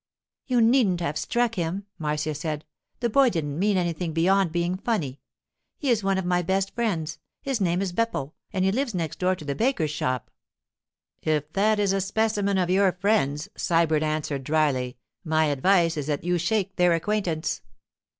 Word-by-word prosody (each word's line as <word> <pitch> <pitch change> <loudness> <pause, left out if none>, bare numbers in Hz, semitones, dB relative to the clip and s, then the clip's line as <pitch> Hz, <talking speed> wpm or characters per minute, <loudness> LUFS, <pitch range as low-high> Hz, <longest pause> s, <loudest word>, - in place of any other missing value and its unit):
'You 250 -3 +3
needn't 225 -6 +4
have 150 -3 -1
struck 235 +10 0
him,' 185 +2 -3
Marcia 150 0 -1
said. 150 0 -4 0.4
'The 235 -2 0
boy 270 +2 +5
didn't 155 -6 -3
mean 200 0 +2
anything 170 -2 -1
beyond 185 +2 +3
being 175 +2 0
funny. 165 - -2 0.6
He 275 -4 0
is 220 -3 +1
one 195 0 +1
of 190 - -2
my 180 0 +2
best 190 +2 0
friends; 175 -10 -2 0.2
his 270 -5 -1
name 180 0 +1
is 185 -3 -3
Beppo, 180 -9 -1 0.2
and 190 -3 0
he 190 - +3
lives 245 -1 -1
next 165 -4 -3
door 185 0 +2
to 155 - -11
the 140 - -1
baker's 215 - 0
shop.' 130 -5 -2 0.9
'If 150 -1 -1
that 210 +2 +3
is 200 -2 +2
a 195 - +1
specimen 205 0 0
of 180 -1 +1
your 190 0 +4
friends,' 180 -7 +1
Sybert 165 -2 +2
answered 155 -3 -2
dryly, 135 -4 0 0.3
'my 160 -2 +2
advice 165 +4 +3
is 145 -1 -3
that 145 -1 -1
you 175 0 +1
shake 195 +2 -1
their 180 -1 +4
acquaintance. 170 -3 -1
180 Hz, 180 wpm, -25 LUFS, 155-200 Hz, 0.9 s, boy